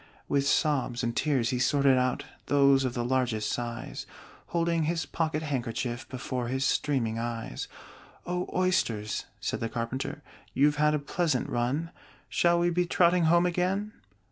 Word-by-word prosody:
With 140 0 +1
sobs 135 -5 +1
and 115 0 -1
tears 135 -5 +1
he 125 - -1
sorted 140 +1 +4
out 125 0 0 0.2
Those 140 -1 +4
of 125 - -2
the 120 -1 -1
largest 120 -4 0
size, 120 - -4 0.4
Holding 170 -1 +1
his 165 +1 -1
pocket 160 -1 -1
handkerchief 120 -3 -3
Before 125 -1 -3
his 130 +2 -1
streaming 115 -7 0
eyes. 115 - -4 0.6
"O 180 0 -2
Oysters," 120 - 0
said - - -2
the 115 - -2
Carpenter, 120 +5 -4 0.3
"You've 145 +1 +4
had 150 0 +3
a - - +2
pleasant 150 -1 0
run! 135 +8 -1 0.4
Shall 170 0 +3
we 175 0 +2
be 175 +1 +1
trotting 175 -1 +4
home 170 +2 +5
again?" 185 +4 0
140 Hz, 150 wpm, -28 LUFS, 120-165 Hz, 0.6 s, home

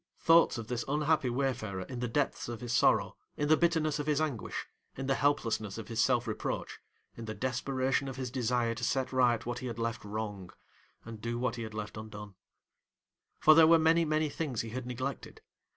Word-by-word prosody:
Thoughts 165 -4 +5
of 115 -2 -6
this 120 -1 -2
unhappy 150 -1 +1
wayfarer 120 -7 -2
in 125 +6 -7
the 125 - -1
depths 135 0 -1
of 120 -2 -5
his 120 -1 -3
sorrow, - - +3 0.2
in 145 0 -1
the 155 - +7
bitterness 160 -3 +1
of 145 - -3
his 150 -1 +2
anguish, 150 -8 -3 0.3
in 135 - -4
the 135 - +2
helplessness 115 -8 0
of 110 -2 -7
his 115 -1 0
self 125 -1 +2
reproach, 110 - -4 0.4
in 115 - -7
the 110 0 -5
desperation 130 +3 -1
of 135 - -5
his 130 -2 -4
desire 120 -2 0
to 110 - -7
set 130 0 0
right 125 -3 +3
what 120 0 -3
he 130 - -5
had 115 -2 -5
left 115 0 -3
wrong, 105 -3 -5 0.6
and 115 -1 -9
do 115 +1 -2
what 125 0 -1
he 120 - -6
had 110 -1 -6
left 105 0 -5
undone. 105 -2 -8 1.0
For, 155 - +7
there 160 0 +7
were 165 +1 +7
many, 165 +1 +4
many 155 0 +1
things 140 -5 -3
he 115 - -6
had 125 +1 -5
neglected. 130 +2 -5
125 Hz, 205 wpm, -31 LUFS, 115-145 Hz, 1.0 s, the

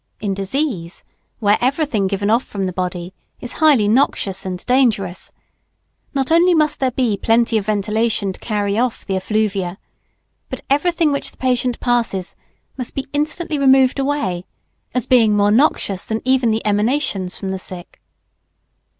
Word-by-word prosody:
In 205 -2 -2
disease 195 - -3 0.4
where 205 -1 +3
everything 260 -6 +1
given 200 +2 -1
off 235 +3 +3
from 195 -2 -4
the 185 - -3
body 180 0 -4 0.3
is 245 - -7
highly 285 -10 +5
noxious 200 -5 +1
and 180 -1 -5
dangerous, 220 -8 +1 0.8
not 270 +2 0
only 345 +2 +5
must 305 -2 +1
there 265 - +2
be 245 -4 0
plenty 230 +3 +2
of 210 -2 0
ventilation 210 -1 0
to - - -14
carry 205 -1 -1
off 245 -1 -1
the 195 - -2
effluvia, 195 -2 -1 0.7
but - - -6
everything 325 +2 +2
which 280 - -2
the - - -24
patient 250 -1 0
passes 230 -7 -1 0.4
must 250 - -5
be 270 - -3
instantly 300 +1 -1
removed 265 -1 +4
away, 270 -11 -1 0.5
as 250 - 0
being 225 -5 +4
more 205 0 +3
noxious 215 -6 +2
than 220 0 -4
even 260 -2 +3
the 220 0 -1
emanations 210 -3 0
from 195 - -5
the 190 0 -3
sick. 180 -1 -9
220 Hz, 155 wpm, -19 LUFS, 195-265 Hz, 0.8 s, highly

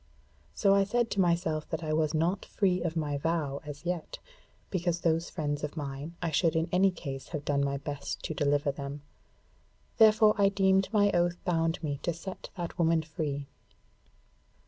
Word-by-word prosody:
So 195 -2 +4
I 200 0 +5
said 235 +4 0
to 200 - +2
myself 170 -3 0
that 160 +1 -3
I 155 -1 -1
was 155 0 +1
not 170 +5 +1
free 185 -3 0
of 170 -1 -2
my 145 -3 -1
vow 150 -3 -1
as 150 +2 -9
yet, 175 -2 -3 0.5
because 175 -2 -1
those 165 0 +1
friends 145 -3 -3
of 150 +2 -4
mine, 145 +3 -5
I 165 - 0
should 160 +1 +2
in 160 +1 +1
any 190 +2 +4
case 140 -7 -6
have 150 -3 -5
done 140 -1 +1
my 140 0 0
best 140 0 -5
to - - -3
deliver 145 -1 +1
them: 140 +1 -7 1.0
therefore 215 -1 +7
I 200 -1 +5
deemed 195 -1 +3
my 205 -2 +4
oath 175 0 +1
bound 165 -1 0
me 145 -3 -2
to 170 - -1
set 185 +3 -8
that 175 0 -5
woman 165 -1 +3
free. 150 -3 -3
165 Hz, 180 wpm, -29 LUFS, 145-180 Hz, 1.0 s, therefore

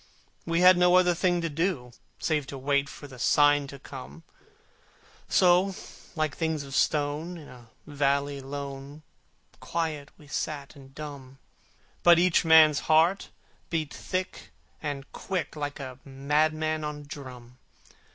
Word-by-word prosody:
We 165 +1 +1
had 185 0 +8
no 180 0 +5
other 180 -1 +5
thing 175 0 +1
to 165 - -1
do, 155 -5 -2 0.3
Save 150 -4 -1
to 140 - -7
wait 140 +1 0
for 145 - -11
the 130 -2 -13
sign 145 +2 +4
to 140 - -9
come: 75 - -10 1.1
So, 185 +1 +4 0.4
like 155 -2 -1
things 160 -3 -2
of 135 -1 -10
stone 150 +5 0
in 155 - -12
a 120 -2 -15 0.2
valley 140 -1 0
lone, 140 +2 -7 0.6
Quiet 155 -4 -3
we 150 - -17
sat 145 0 -4
and 135 -1 -15
dumb: 140 -3 -9 0.6
But 175 -1 +7
each 180 0 +3
man's 160 -2 +6
heart 165 +5 +3 0.4
beat 160 -3 -2
thick 185 0 -4 0.3
and 145 -3 -4
quick, 185 -5 -4
Like 145 -1 -4
a 130 -2 -8
madman 155 +3 0
on 150 -1 -5
a - - -12
drum! 130 -4 -11
150 Hz, 140 wpm, -27 LUFS, 140-165 Hz, 1.1 s, had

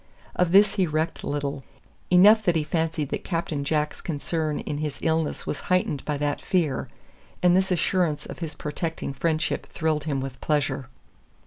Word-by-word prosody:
Of 180 -2 +2
this 200 +1 +6
he 185 -2 +3
recked 155 +1 -1
little; 140 -1 -3 0.5
enough 205 +5 +7
that 175 - +3
he 160 - +2
fancied 160 -2 -1
that - - -3
Captain 165 -5 -2
Jack's 150 +1 -1
concern 155 -1 -2
in 145 -1 -4
his 150 -2 -3
illness 160 -1 0
was - - -3
heightened 180 -6 +1
by 150 -1 -1
that 145 0 -1
fear, 160 -8 0 0.5
and 180 0 +6
this 190 0 +2
assurance 175 -3 +1
of - - -8
his 165 -3 -4
protecting 150 0 -4
friendship 155 +2 -1
thrilled 155 -2 -1
him 140 -3 -1
with 135 -1 -6
pleasure. 145 -4 0
155 Hz, 165 wpm, -25 LUFS, 145-175 Hz, 0.5 s, enough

